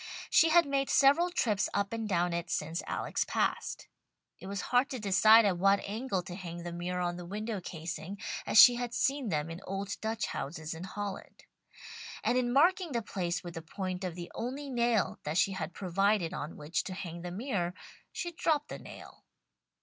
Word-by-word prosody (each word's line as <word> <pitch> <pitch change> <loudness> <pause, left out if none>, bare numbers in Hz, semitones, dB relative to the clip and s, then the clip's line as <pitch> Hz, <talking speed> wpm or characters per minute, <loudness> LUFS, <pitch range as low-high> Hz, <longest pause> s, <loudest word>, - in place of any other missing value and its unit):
She 325 - +6
had 340 +1 +6
made 275 -1 0
several 290 +6 +5
trips 215 - +1
up 200 +1 0
and 225 -2 -3
down 175 -2 +1
it 170 0 -3
since 160 +2 -2
Alex - - -1
passed. - - -2 0.5
It - - -9
was 200 -1 -3
hard 250 +3 +4
to 260 - -4
decide 215 +2 +6
at 185 -4 +1
what 195 +2 +4
angle 205 -2 -3
to 180 -1 -8
hang 175 -2 -7
the 175 - -5
mirror 180 +1 -3
on 175 0 -1
the 175 - -7
window 210 +1 -4
casing, 170 +3 -6 0.3
as - - +6
she 245 - +11
had 240 -1 -3
seen 270 -4 0
them 155 -1 -1
in 165 +3 -7
old 195 +1 -3
Dutch 220 +1 -1
houses 155 +2 -5
in 165 +3 -7
Holland; 200 0 -6 0.8
and 240 - +2
in 250 -1 +1
marking 340 +4 +3
the 235 -2 -1
place 175 -4 -3
with 175 -1 -7
the 165 - -6
point 185 +3 -5
of 180 -3 -3
the 175 -1 -7
only 270 +4 -4
nail 235 -4 +1
that 150 +3 -2
she 200 - +3
had 180 -3 -4
provided 195 0 +1
on 150 - -5
which 150 +3 -2
to 185 - -5
hang 170 -2 -6
the 175 - -5
mirror, 185 -3 -2 0.4
she 345 - -4
dropped 315 -3 0
the - - -6
nail. - - -12
195 Hz, 195 wpm, -31 LUFS, 175-240 Hz, 0.8 s, she